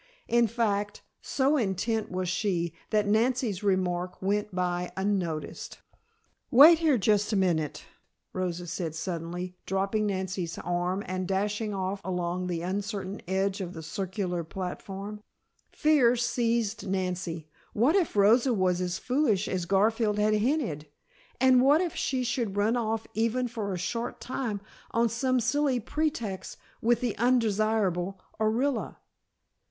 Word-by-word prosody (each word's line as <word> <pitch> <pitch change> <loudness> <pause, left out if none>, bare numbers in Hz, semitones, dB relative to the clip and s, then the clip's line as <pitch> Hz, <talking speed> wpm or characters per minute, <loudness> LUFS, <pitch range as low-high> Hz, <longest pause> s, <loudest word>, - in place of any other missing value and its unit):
In 235 0 +4
fact, 205 -2 -1 0.2
so 280 +2 +1
intent 220 0 -1
was 185 0 -2
she, 175 -3 -1 0.2
that 210 -1 +2
Nancy's 225 -1 +1
remark 180 -2 0
went 205 +2 0
by 180 -1 -1
unnoticed. 190 -5 -2 0.7
"Wait 310 +6 +9
here 310 -6 +3
just 210 0 +2
a - - +1
minute," 170 -6 0 0.5
Rosa 180 -1 -2
said 170 -2 -4
suddenly, 175 +2 -4
dropping 195 +3 0
Nancy's 185 -3 -3
arm 175 +3 -1
and 185 0 -3
dashing 205 +2 -1
off 190 +1 -2
along 180 0 -2
the 170 -2 -2
uncertain 200 +1 -3
edge 195 +1 0
of 180 -1 -5
the 160 - -8
circular 180 0 -3
platform. 195 +4 -6 0.5
Fear 290 -6 +4
seized 235 -3 0
Nancy! 180 -4 -2 0.3
What 255 - +3
if 365 - +1
Rosa 230 +5 +5
was 185 -2 +1
as 180 -1 -1
foolish 250 -7 +1
as 180 -2 -2
Garfield 210 +2 +2
had 210 +1 +3
hinted, 215 - 0 0.5
and 260 -1 +6
what 285 +4 +5
if 350 -2 -2
she 260 -2 -1
should 235 -4 -2
run 215 +4 +2
off 225 -2 -1
even 230 +3 0
for 220 -4 -4
a 185 - -2
short 230 +7 -3
time 245 -6 -3 0.3
on 230 0 +2
some 255 +3 +1
silly 260 +2 +1
pretext 240 -7 -3 0.2
with 235 +1 +2
the 240 -4 -1
undesirable 215 -6 +1 0.2
Orilla? 235 +6 0
205 Hz, 135 wpm, -28 LUFS, 185-235 Hz, 0.7 s, Wait